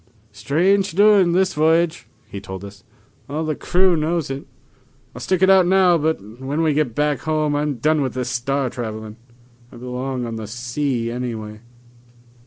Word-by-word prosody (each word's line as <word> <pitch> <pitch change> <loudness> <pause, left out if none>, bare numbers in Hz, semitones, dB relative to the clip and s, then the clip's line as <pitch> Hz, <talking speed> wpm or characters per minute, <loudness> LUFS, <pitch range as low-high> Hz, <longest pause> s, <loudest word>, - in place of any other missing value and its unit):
"Strange 175 - +1
doings 200 -2 +5
this 190 0 +2
voyage," 160 -4 +1 0.2
he 100 - -8
told 95 0 -8
us. 100 -1 -13 0.5
"All 155 +3 -2
the 155 -1 -1
crew 185 +3 +2
knows 160 -2 -1
it. 135 +1 -6 0.7
I'll - - -9
stick 185 -1 0
it 190 - +5
out 190 -2 +5
now, 185 -2 +4
but 120 -8 -3
when 145 +5 -1
we 155 -2 +2
get 145 -6 0
back 150 -2 +1
home 155 -2 0
I'm 145 -1 -1
done 150 +5 +1
with 130 -3 -2
this 125 -1 -2
star 130 +1 -1
travelin'. 110 -2 -6 0.5
I - - -12
belong 125 +1 -4
on 115 -1 -5
the 110 -1 -6
sea 120 +1 -2
anyway." 110 -3 -5
140 Hz, 170 wpm, -21 LUFS, 120-165 Hz, 0.7 s, doings